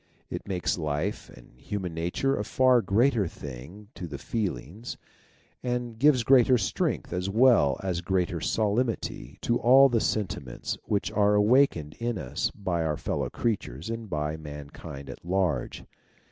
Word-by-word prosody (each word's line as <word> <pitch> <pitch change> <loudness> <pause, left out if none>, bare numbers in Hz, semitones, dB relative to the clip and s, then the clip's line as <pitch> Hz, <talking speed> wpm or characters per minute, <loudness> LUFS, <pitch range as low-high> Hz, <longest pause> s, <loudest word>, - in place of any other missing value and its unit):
It - - -5
makes 90 -2 -1
life 75 +6 -2
and - - -17
human 95 -1 -4
nature 90 +12 0
a 105 - -2
far 130 +2 +4
greater 115 -1 +2
thing 75 +9 -9
to 90 - -6
the 75 -3 -6
feelings, 110 - -4 0.6
and 120 -2 -3
gives 135 -3 +5
greater 130 0 +6
strength 100 -5 -1
as 90 +2 -2
well 115 - +4
as 90 -3 -1
greater 90 -2 -1
solemnity 110 +3 -1
to 120 0 +1
all 135 +3 +7
the 115 -3 +1
sentiments 70 - -2
which 100 -1 -1
are 105 0 +3
awakened 105 - +3
in 120 -1 -1
us 65 -8 -2
by 90 -4 -2
our 75 -2 -1
fellow - - -2
creatures 100 - -3
and 115 -2 -5
by 75 0 -2
mankind 75 -2 -9
at - - -9
large. 90 -6 -1
100 Hz, 145 wpm, -27 LUFS, 80-115 Hz, 0.6 s, all